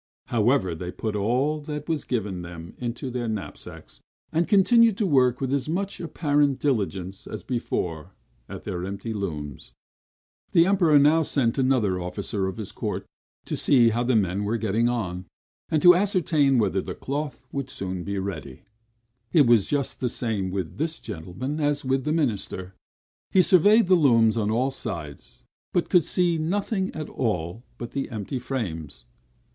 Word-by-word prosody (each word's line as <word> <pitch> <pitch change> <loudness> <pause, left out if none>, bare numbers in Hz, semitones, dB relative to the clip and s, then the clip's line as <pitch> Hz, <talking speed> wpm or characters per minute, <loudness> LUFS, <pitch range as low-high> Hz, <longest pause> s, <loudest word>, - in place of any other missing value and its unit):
However, 115 -5 +2
they 90 +2 -5
put 110 +2 -4
all 130 +9 0
that 150 0 -6
was 160 -3 -1
given 105 -7 -2
them 85 0 -9
into 125 +1 -4
their 120 -1 -3
knapsacks; 110 -3 -7 0.3
and 165 +1 +1
continued 225 +2 +5
to 215 - +1
work 130 -7 +3
with 135 0 -1
as 140 +1 -1
much 195 +4 -2
apparent 145 -4 +1
diligence 100 -8 -2
as - - -7
before 90 - -3 0.3
at - - -8
their 90 0 -4
empty 100 +4 -4
looms. 75 - -5 0.8
The 165 - +6
Emperor 175 -6 +4
now 150 +3 +5
sent 135 -5 0
another 120 -9 +2
officer 95 +3 -3
of 95 - -5
his 110 -3 -6
court - - -4 0.4
to - - -3
see 120 -4 +4
how 115 +2 0
the 125 0 +1
men 100 -1 +1
were 110 +3 0
getting 115 +2 +1
on, 90 -7 -3 0.4
and 155 -2 +1
to 180 - +10
ascertain 170 -8 +2
whether 100 -4 +1
the - - -6
cloth 140 -1 -4
would 140 -1 -4
soon 95 -4 -4
be 100 +1 -3
ready. 80 -9 -5 0.7
It 150 -5 +5
was 115 -4 +4
just 145 -2 -1
the 125 - 0
same 110 -6 -2
with 95 - -4
this 160 +1 -2
gentleman 105 - -5
as 145 -2 0
with 130 +1 0
the 150 - 0
minister; 105 - -1 0.6
he 185 - +5
surveyed 205 +6 +5
the 185 - +3
looms 115 -10 +5
on 110 -2 0
all 125 +5 +1
sides, 85 - -7 0.3
but 175 - +1
could 175 -5 +5
see 175 -2 +1
nothing 190 +4 -1
at 155 -1 -4
all 105 -3 -2 0.2
but 120 -1 -7
the 135 - -3
empty 115 +3 -4
frames. 85 - -5
120 Hz, 165 wpm, -25 LUFS, 95-150 Hz, 0.8 s, to